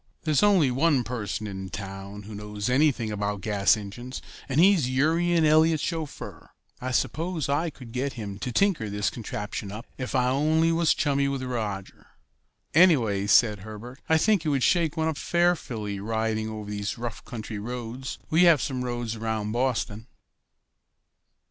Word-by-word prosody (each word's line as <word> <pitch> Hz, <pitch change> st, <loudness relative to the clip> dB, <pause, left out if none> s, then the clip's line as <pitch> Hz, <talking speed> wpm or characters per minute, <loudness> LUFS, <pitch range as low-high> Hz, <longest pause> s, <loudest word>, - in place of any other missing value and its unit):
There's 155 Hz, -3 st, +2 dB
only 190 Hz, -10 st, +4 dB
one 140 Hz, 0 st, +2 dB
person 115 Hz, -3 st, -4 dB
in 95 Hz, -2 st, -6 dB
town 100 Hz, +1 st, -7 dB
who 105 Hz, +2 st, -9 dB
knows 105 Hz, +2 st, -4 dB
anything 130 Hz, -5 st, +2 dB
about 100 Hz, -1 st, -2 dB
gas 105 Hz, 0 st, +3 dB
engines, 120 Hz, +6 st, -7 dB, 0.3 s
and 135 Hz, +3 st, +1 dB
he's 175 Hz, -7 st, +5 dB
Urian 165 Hz, +5 st, +2 dB
Eliot's 155 Hz, +1 st, +4 dB
chauffeur. 160 Hz, -4 st, -5 dB, 0.3 s
I 130 Hz, -, -3 dB
suppose 160 Hz, +5 st, -1 dB
I 145 Hz, +4 st, 0 dB
could 125 Hz, -5 st, -12 dB
get 130 Hz, +3 st, -2 dB
him 100 Hz, -4 st, -6 dB
to 125 Hz, -, -3 dB
tinker 165 Hz, -, +1 dB
this 105 Hz, 0 st, -1 dB
contraption 105 Hz, -3 st, -5 dB
up 110 Hz, +4 st, -7 dB
if 130 Hz, -, -3 dB
I 125 Hz, -1 st, +3 dB
only 155 Hz, +4 st, +2 dB
was 165 Hz, 0 st, +3 dB
chummy 140 Hz, -1 st, +1 dB
with 135 Hz, -1 st, -2 dB
Roger." 110 Hz, -6 st, -4 dB, 0.7 s
"Anyway," 120 Hz, -, +4 dB
said 105 Hz, -1 st, +5 dB
Herbert, 110 Hz, +6 st, -10 dB
"I 160 Hz, -, +5 dB
should 160 Hz, -, +1 dB
think 210 Hz, -6 st, +3 dB
it 155 Hz, -, 0 dB
would 135 Hz, -3 st, +1 dB
shake 170 Hz, -3 st, +2 dB
one 160 Hz, 0 st, +1 dB
up 160 Hz, -2 st, -2 dB
fearfully 130 Hz, -, 0 dB
riding 110 Hz, +1 st, -1 dB
over 105 Hz, -1 st, -6 dB
these 100 Hz, -1 st, -3 dB
rough 120 Hz, -1 st, -5 dB
country 110 Hz, -3 st, -6 dB
roads. 120 Hz, +3 st, -5 dB
We 170 Hz, +3 st, +5 dB
have 165 Hz, -4 st, +6 dB
some 130 Hz, +1 st, -2 dB
roads 120 Hz, -2 st, -3 dB
around 110 Hz, -1 st, -2 dB
Boston." 120 Hz, -2 st, -1 dB
125 Hz, 165 wpm, -26 LUFS, 105-155 Hz, 0.7 s, have